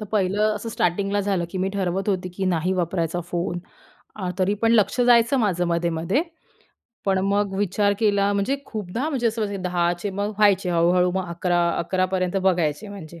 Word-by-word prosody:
तर - - -4
पहिलं 210 +2 +2
असं 230 - -6
स्टार्टिंगला 200 -1 0
झालं 195 -3 0
की 185 - -4
मी 190 - 0
ठरवत 190 +1 -1
होती 185 -2 -1
की 195 - -2
नाही 180 0 +1
वापरायचा 175 -1 -1
फोन 175 0 -2 0.6
अ, 185 -4 -4
तरी 190 +2 +2
पण 230 0 +3
लक्ष 225 +2 +3
जायचं 240 +2 +4
माझं 180 -5 +1
मध्ये 170 0 0
मध्ये 170 - 0 0.8
पण 195 -1 +2
मग 200 0 +1
विचार 205 +1 +1
केला. 205 -2 +2
म्हणजे 200 +8 0
खूपदा 220 - -3
म्हणजे 255 -6 0
असं 210 -4 -2
10:00चे 175 +2 -1
मग 200 +2 -2
व्हायचे 195 -3 +3
हळू-हळू 175 +1 +3
मग 190 -2 -2
11:00- 175 0 +1
11:00पर्यंत 185 +1 0
बघायचे 180 0 +1
म्हणजे 170 -4 -10
190 Hz, 175 wpm, -23 LUFS, 175-205 Hz, 0.8 s, जायचं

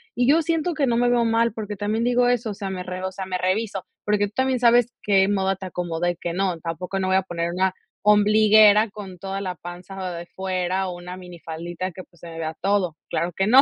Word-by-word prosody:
Y 245 0 +2
yo 320 +3 +5
siento 330 +1 0
que 290 -3 +1
no 235 -1 +2
me 245 - +3
veo 240 -1 +3
mal, 230 0 +2
porque 210 -2 -5
también 215 +3 -1
digo 245 0 +3
eso, 245 -2 +1
o - - -4
sea, 195 0 -5
me 185 -1 -4
re 185 0 -6
o 190 - -2
sea, 190 0 -6
me 185 -1 -2
reviso, 195 +1 -1 0.2
porque 205 0 +2
tú 200 - -16
también 260 -1 +1
sabes 240 -1 +5
qué 195 -2 +3
moda 195 -1 +1
te 190 0 -8
acomoda 175 -1 -2
y 175 - -1
qué 170 -1 -4
no, 185 -2 0
tampoco 180 +4 -4
no 185 - -1
voy 190 - +2
a 190 - +3
poner 170 -2 -3
una 185 +1 +1 0.3
ombliguera 210 +1 +6
con 195 -3 -9
toda 195 +2 -4
la 185 -2 -3
panza 180 +1 -7
de 170 0 -6
fuera, 185 0 -2
o, 180 - -5
una 180 +1 -8
minifaldita 175 0 -6
que, 185 +2 -9
pues, 170 -2 -25
se 170 - -9
me 165 - -9
vea 160 -1 -3
todo. 190 -4 +1
Claro 170 +1 -1
que 190 +4 0
no. 260 +4 +8
190 Hz, 245 wpm, -23 LUFS, 180-215 Hz, 0.3 s, no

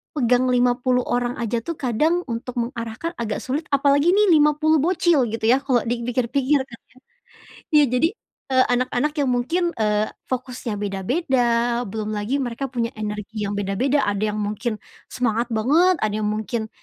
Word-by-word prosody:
pegang 250 -1 +2
50 250 0 +2
orang 245 0 -1
aja, 235 0 -2
tuh, 335 +8 -5
kadang 305 +8 0
untuk 240 +2 -5
mengarahkan 235 +6 -5
agak 220 -3 -3
sulit, 290 +5 -3
apalagi 285 +6 +3
ini 415 -3 +4
50 305 0 +4
bocil 335 -5 +2
gitu 220 0 -5
yah, 265 - +4
kalo 265 -3 +1
dipikir-pikir, 245 +4 0
kan, 240 -3 -14 0.2
ya. - - -21 0.8
Iya, 300 -1 +6
jadi 320 +6 +3 0.4
e - - +2 0.2
anak-anak 255 +4 0
yang 280 -4 +1
mungkin, 255 +9 0 0.2
eee, 210 0 +1 0.2
fokusnya 250 -3 -4
beda-beda, 240 - 0 0.4
belum 215 +1 -4
lagi 210 +6 -1
mereka 265 0 -3
punya 240 -1 -2
energi 210 0 -4
yang 205 - -3
beda-beda. 245 +9 0
Ada 205 +1 0
yang - - -3
mungkin 215 +2 -3 0.3
semangat 235 -1 -1
banget. 295 +11 +3
Ada 215 0 -1
yang 210 - 0
mungkin 220 +1 -3
245 Hz, 155 wpm, -22 LUFS, 220-280 Hz, 0.8 s, Iya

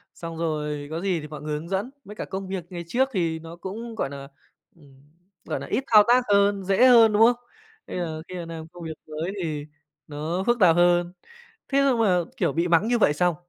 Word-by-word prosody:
xong 165 -1 -7
rồi 150 -3 -3
có 165 +1 -3
gì 185 -3 0
thì 150 - -8
mọi 150 0 -9
người 150 0 -4
hướng 165 +2 -10
dẫn, 195 +6 -2 0.2
với 210 - -10
cả - - -5
công 190 0 -6
việc 190 -2 -4
ngày 175 -2 -6
trước 260 +9 +1
thì 165 -4 -1
nó 165 +1 -10
cũng, 220 +6 -7
gọi 140 - -2
nà, 140 0 -8 0.5
ừm, 140 -5 -20 0.4
gọi - - -3
nà, - - -7
ít 265 - -1
thao 210 -2 +7
tác 245 +1 +5
hơn, 200 -1 +3
dễ 195 +7 +4
hơn, 230 -3 +7
đúng 210 - +3
không? 240 +1 +6 0.5
Bây - - -5
giờ 160 -3 -4
khi 185 - -8
mà 175 - -5
làm 165 -1 -8
công 175 +1 -12
việc 160 -1 -5
mới 155 +4 -4
thì 150 -3 -4 0.4
nó 155 +5 -3
phức 240 0 +2
tạp 175 -4 +6
hơn. 175 0 +3 0.6
Thế 275 - +1
nhưng 250 -3 +2
mà, 195 -5 +3 0.2
kiểu, - - 0
bị 170 +4 0
mắng 175 +6 +3
như 240 - +2
vậy 175 -9 +3
xong 175 +2 +1
175 Hz, 235 wpm, -24 LUFS, 160-205 Hz, 0.6 s, thao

